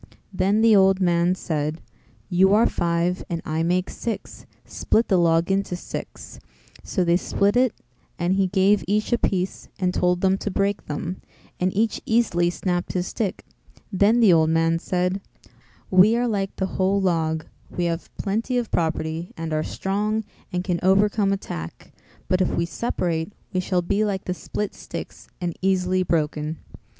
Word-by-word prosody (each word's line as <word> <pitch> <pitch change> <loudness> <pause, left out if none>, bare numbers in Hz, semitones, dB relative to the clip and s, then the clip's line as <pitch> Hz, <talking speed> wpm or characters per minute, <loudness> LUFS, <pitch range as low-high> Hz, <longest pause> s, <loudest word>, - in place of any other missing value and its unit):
Then 195 +3 +2
the 225 -1 +6
old 190 -1 +5
man 175 -1 +2
said, 155 -2 -2 0.5
"You 190 +2 +4
are 225 - +5
five 170 +2 0
and 170 -2 -2
I 155 +1 -1
make 180 +2 +1
six; 230 -2 -6 0.2
split 225 - 0
the 190 - +4
log 165 +1 +3
into 195 -2 0
six," 175 - -8 0.4
So 185 - 0
they 170 0 +3
split 200 +3 +1
it 250 -1 +4 0.5
and 175 0 +1
he 195 0 +2
gave 195 +2 +3
each 210 +4 0
a 240 - +2
piece 185 -1 -1
and 180 -1 0
told 180 0 +1
them 190 0 +2
to - - -3
break 200 +1 -1
them, 170 +5 -4 0.4
and 185 +1 +1
each 220 0 +1
easily 205 -7 +2
snapped 175 0 -2
his 180 -1 -1
stick; 205 0 -3 0.5
then 210 +5 +4
the 205 -6 +7
old 160 -1 +4
man 165 0 +2
said 180 +2 -1 0.7
"We 190 +5 +6
are 245 0 +1
like 195 -4 -2
the 190 - -1
whole 190 +1 +1
log: 160 -4 0 0.2
we 175 - -2
have 170 0 -3
plenty 225 +5 -1
of 240 -2 -2
property 160 0 -1
and 165 -1 -4
are 155 - +1
strong 210 +6 -1 0.3
and 180 -1 -1
can 180 -2 -1
overcome 200 +2 +3
attack; 85 - -6 0.3
but 185 0 +2
if 185 - +2
we 170 - 0
separate 170 -2 -2 0.2
we 185 - +1
shall 180 -1 0
be 200 +4 +1
like 200 -2 -2
the 180 - -1
split 205 +3 -4
sticks - - -8
and 175 -2 -3
easily 185 -1 +1
broken." 155 -2 -1
185 Hz, 170 wpm, -23 LUFS, 170-200 Hz, 0.7 s, the